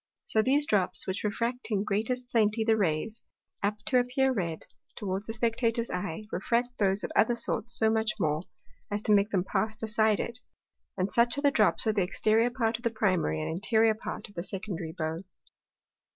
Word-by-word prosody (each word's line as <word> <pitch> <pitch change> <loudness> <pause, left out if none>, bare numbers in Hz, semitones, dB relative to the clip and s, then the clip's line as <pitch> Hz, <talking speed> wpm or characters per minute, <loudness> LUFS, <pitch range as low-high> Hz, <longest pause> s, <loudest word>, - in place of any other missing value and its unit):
So 220 - +2
those 280 +5 +3
drops, 200 -9 0
which 190 +1 -3
refract 230 +4 -2
in 205 -3 0
greatest 225 +5 -1
plenty 220 -1 +2
the 220 0 +3
Rays, 200 +3 -1 0.4
apt 210 +1 -2
to 265 -5 +4
appear 260 +2 +1
red, 170 -8 -2 0.3
toward 195 -1 -3
the 225 - -3
Spectator's 230 0 0
Eye, 180 +1 -4
refract 240 +6 -1
those 195 0 +2
of - - -4
other 235 +2 +4
sorts 235 0 +1
so 220 0 +4
much 220 -1 +1
more, 155 -3 +1 0.5
as 205 0 -2
to 210 - +3
make 200 +1 +4
them 190 -5 +1
pass 215 +3 -1
beside 220 -1 +1
it; 235 +1 +1 0.6
and 185 +2 -1
such 235 +2 +4
are - - -1
the 285 -1 +4
drops 215 -2 +3
on 220 - +2
the 205 - +1
Exteriour 215 +5 +2
part 230 -2 0
of 235 - -18
the 235 - +2
Primary, 185 - 0
and 80 - -3
Interiour 220 +1 +3
part 220 - -6
of 205 - -18
the 175 - -4
Secondary 180 -3 -5
Bow. 160 0 -2
220 Hz, 195 wpm, -29 LUFS, 195-235 Hz, 0.6 s, to